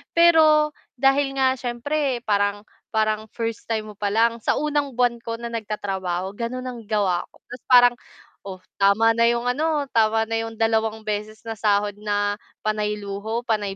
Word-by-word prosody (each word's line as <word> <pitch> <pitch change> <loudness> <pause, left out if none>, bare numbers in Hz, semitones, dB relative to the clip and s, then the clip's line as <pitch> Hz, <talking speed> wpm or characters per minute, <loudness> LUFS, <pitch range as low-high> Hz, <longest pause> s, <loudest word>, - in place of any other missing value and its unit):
Pero, 310 -3 +5 0.2
dahil 270 +1 +2
nga 260 -1 +2
siyempre 250 +1 -2
parang 205 0 0 0.2
parang 215 0 0
first 230 -1 -4
time 215 -2 -3
mo - - -16
palang 225 +3 +1
sa - - 0
unang 290 -3 -1
buwan 245 -1 +1
ko 230 0 -5
na 235 0 -7
nagtatrabaho 195 -4 -3
gano'n 240 +3 -4
ang 245 -2 -6
gawa 195 -5 0
ko, - - -27
tapos 245 -1 -11
parang, 245 -1 +7 0.5
"Oh, 185 -1 -8 0.2
tama 210 +3 +4
na 230 +1 +3
yung 235 0 +1
ano, 295 +4 0
tama 225 -1 +3
na 225 0 -2
yung 225 0 -5
dalawang 220 0 0
beses 215 +1 -4
na 225 - -6
sahod 205 -1 +1
na 205 0 -1 0.2
panay 210 -1 -1
luho, 210 +3 -4
panay 205 -4 -1
225 Hz, 165 wpm, -23 LUFS, 210-245 Hz, 0.5 s, parang